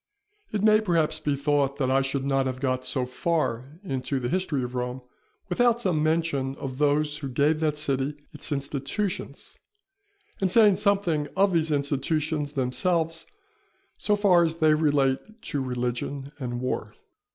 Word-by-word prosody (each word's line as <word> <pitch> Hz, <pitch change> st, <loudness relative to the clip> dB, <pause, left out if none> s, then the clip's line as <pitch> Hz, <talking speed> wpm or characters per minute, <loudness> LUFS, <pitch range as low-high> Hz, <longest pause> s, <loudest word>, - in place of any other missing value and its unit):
It 210 Hz, -, -1 dB
may 215 Hz, 0 st, +6 dB
perhaps 165 Hz, -6 st, +1 dB
be 150 Hz, -2 st, 0 dB
thought 140 Hz, -1 st, +1 dB
that 130 Hz, -2 st, 0 dB
I 135 Hz, +1 st, +4 dB
should 135 Hz, 0 st, -2 dB
not 135 Hz, -1 st, +1 dB
have 130 Hz, 0 st, -4 dB
got 130 Hz, -1 st, -1 dB
so 130 Hz, -2 st, 0 dB
far 135 Hz, 0 st, -2 dB
into 135 Hz, -4 st, -2 dB
the 120 Hz, -1 st, -2 dB
history 165 Hz, -6 st, -1 dB
of 125 Hz, 0 st, -5 dB
Rome, 125 Hz, +1 st, -3 dB, 0.4 s
without 235 Hz, +5 st, +2 dB
some 180 Hz, -9 st, +1 dB
mention 155 Hz, -4 st, 0 dB
of 130 Hz, -1 st, -6 dB
those 150 Hz, 0 st, +2 dB
who 140 Hz, -3 st, -5 dB
gave 145 Hz, +5 st, +2 dB
that 155 Hz, -2 st, 0 dB
city 140 Hz, -1 st, -1 dB, 0.2 s
its 150 Hz, +1 st, -6 dB
institutions, 140 Hz, +7 st, -3 dB, 0.8 s
and 190 Hz, -2 st, +1 dB
saying 210 Hz, -4 st, +6 dB
something 195 Hz, -7 st, +1 dB
of 195 Hz, 0 st, +4 dB
these 160 Hz, -1 st, +2 dB
institutions 145 Hz, +1 st, -1 dB
themselves, 165 Hz, +5 st, 0 dB, 0.7 s
so 210 Hz, -, +1 dB
far 190 Hz, -4 st, +4 dB
as 165 Hz, -1 st, 0 dB
they 155 Hz, -2 st, +4 dB
relate 145 Hz, -, +1 dB
to 145 Hz, -, -2 dB
religion 125 Hz, +2 st, -3 dB
and 120 Hz, -2 st, -4 dB
war. 110 Hz, -4 st, -3 dB
145 Hz, 155 wpm, -26 LUFS, 135-165 Hz, 0.8 s, may